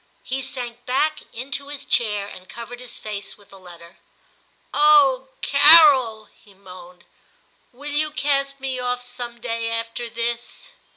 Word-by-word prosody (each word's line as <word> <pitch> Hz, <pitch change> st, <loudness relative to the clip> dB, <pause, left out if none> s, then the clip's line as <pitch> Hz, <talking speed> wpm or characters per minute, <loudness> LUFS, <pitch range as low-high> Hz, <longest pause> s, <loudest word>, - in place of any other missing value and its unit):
He 265 Hz, +1 st, -4 dB
sank 245 Hz, -3 st, -6 dB
back 305 Hz, +5 st, 0 dB
into 270 Hz, +3 st, -5 dB
his 285 Hz, -1 st, -7 dB
chair 210 Hz, -4 st, +1 dB
and 185 Hz, -2 st, -13 dB
covered 235 Hz, +1 st, -9 dB
his 250 Hz, -2 st, -4 dB
face 205 Hz, -2 st, -6 dB
with 205 Hz, -1 st, -21 dB
the 195 Hz, -, -14 dB
letter. 175 Hz, -1 st, -15 dB, 0.4 s
* -, -, -40 dB
Oh! 285 Hz, -3 st, +5 dB, 0.2 s
Carol,' 280 Hz, -7 st, +6 dB
he 200 Hz, -2 st, -23 dB
moaned, 180 Hz, -2 st, -14 dB, 0.4 s
* -, -, -40 dB
will 285 Hz, +4 st, -7 dB
you 305 Hz, +1 st, +1 dB
cast 275 Hz, -2 st, -1 dB
me 265 Hz, -1 st, -3 dB
off 245 Hz, 0 st, -2 dB
some 245 Hz, -1 st, -8 dB
day 230 Hz, -1 st, -3 dB
after 230 Hz, +1 st, -4 dB
this 235 Hz, +1 st, -4 dB
245 Hz, 155 wpm, -22 LUFS, 220-275 Hz, 0.4 s, Carol